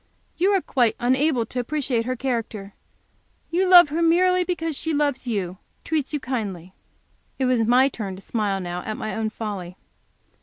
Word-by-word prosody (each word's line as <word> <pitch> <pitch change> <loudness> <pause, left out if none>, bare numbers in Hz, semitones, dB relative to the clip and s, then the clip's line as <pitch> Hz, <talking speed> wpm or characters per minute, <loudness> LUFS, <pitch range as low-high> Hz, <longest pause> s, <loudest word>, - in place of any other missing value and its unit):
You 370 +4 +2
are 385 - +2
quite 240 -4 +1
unable 260 0 +2
to 250 - -5
appreciate 245 -3 -1
her 255 +1 -2
character; 230 -6 -4 0.8
you 370 +3 +2
love 350 -4 +9
her 320 +3 -1
merely 365 +2 +3
because 330 -3 -3
she 320 +2 -2
loves 285 -3 0
you, 190 -5 -3 0.2
treats 305 -4 -2
you 300 - -1
kindly?'" 200 -9 -4 0.6
It 265 - 0
was 250 -2 +2
my 250 +3 +5
turn 210 -8 -5
to 190 - -11
smile 205 -4 -1
now, 175 -1 -4
at 215 +3 -5
my 215 - -4
own 220 -1 -1
folly. 200 -5 -6
250 Hz, 175 wpm, -23 LUFS, 215-305 Hz, 0.8 s, love